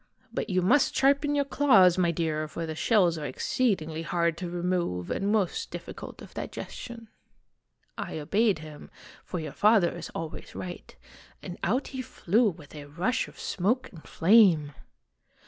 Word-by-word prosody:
But - - -3
you 185 -1 +1
must 250 +9 +3
sharpen 280 +2 +3
your 285 -1 +2
claws, 205 -12 +5
my 175 -2 +2
clear, 155 -2 -1
for 165 +2 -5
the 160 - -4
shells 175 -2 +2
are 150 - -5
exceedingly 160 - -1
hard 170 0 0
to 180 -1 -5
remove 175 - -2
and 200 +1 0
most 205 -5 0
difficult - - -8
of - - -13
digestion. 230 -2 -7 0.5
" - - -47
I - - -4
obeyed 200 +7 +2
him, 155 -1 -11 0.3
for 180 - -5
your 155 - -6
father 210 -5 +4
is 170 - -7
always 160 -1 -7
right, 180 -1 -7 0.5
and 180 -2 -7
out 245 +9 0
he 260 -1 -5
flew 225 -1 +1
with 155 -5 -12
a 150 -2 -8
rush 175 +12 -1
of - - -15
smoke 215 +8 -1
and 165 - -12
flame." 170 -6 +4
180 Hz, 165 wpm, -28 LUFS, 160-220 Hz, 0.5 s, claws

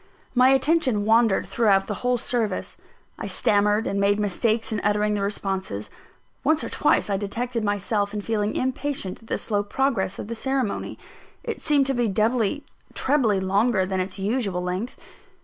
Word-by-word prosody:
My 255 +1 +5
attention 265 -6 +2
wandered 225 -2 +3
throughout 200 -4 +2
the 210 - -3
whole 250 0 +2
service. 230 -5 -2 0.4
I - - -4
stammered 210 +1 +2
and 200 - -1
made 200 +1 +2
mistakes 220 +3 0
in 215 - -1
uttering 210 0 +2
the 205 - -1
responses. 190 - -3 0.5
Once 315 0 +2
or - - -4
twice - - +2
I 200 -2 0
detected 230 +4 -3
myself 205 0 0
in 210 0 -3
feeling 210 -1 -1
impatient 260 -6 -2
at 225 - -17
the - - -1
slow 205 -2 -1
progress 210 -2 -1
of - - -6
the 230 - -4
ceremony 260 -1 -2 0.5
it - - -4
seemed 290 -3 +3
to 270 - 0
be 240 -2 +1
doubly, 220 +6 +1 0.3
trebly 255 -8 +2
longer 195 +2 +2
than 190 0 -2
its 185 +2 -3
usual 200 -3 -1
length. 185 +7 -4
210 Hz, 165 wpm, -24 LUFS, 200-245 Hz, 0.5 s, My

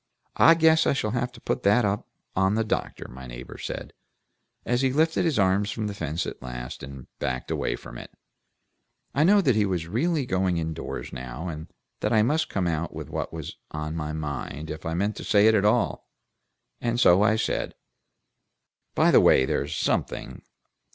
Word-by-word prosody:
"I 165 - +7
guess 160 0 +4
I - - +3
shall 110 -6 -1
have 125 +1 -1
to 120 - -13
put - - -2
that 105 +4 +4
up 100 +1 -1 0.3
on 95 +2 +2
the 115 - +2
doctor," 110 - -3
my 65 +1 -10
neighbor - - -9
said, - - -6 0.7
as 120 +1 +1
he 135 -1 +2
lifted 160 +5 +2
his 160 -5 +1
arms 100 +1 +2
from 110 0 -3
the 105 - -3
fence 80 -4 -3
at - - -7
last, 60 -1 -7
and 65 -2 -9
backed 65 -1 -3
away - - -1
from - - -10
it. - - -10 1.0
I 145 - +3
knew 200 +4 +5
that 130 - +4
he 110 - +3
was 90 -4 -1
really 145 - 0
going 95 -4 0
in 80 -1 -2
doors - - -6
now, 65 +7 -6
and 80 0 -7 0.3
that - - -1
I 110 -1 +5
must 155 +7 +1
come 95 -2 -1
out 85 -1 -2
with - - -7
what - - -3
was 80 -2 -7 0.2
in 75 +1 -4
my 75 -2 -3
mind, 75 0 -5
if 80 +1 -6
I 80 - -2
meant 100 +4 -1
to - - -6
say 105 0 +4
it 110 - +6
at 105 -2 +3
all, 105 - +1 0.7
and 120 0 0
so 95 -6 +6
I 110 +1 +4
said, 110 - -2 1.2
"By - - +4
the - - +7
way, 65 - +5
there's - - -1
something. - - -2
95 Hz, 200 wpm, -26 LUFS, 75-120 Hz, 1.2 s, I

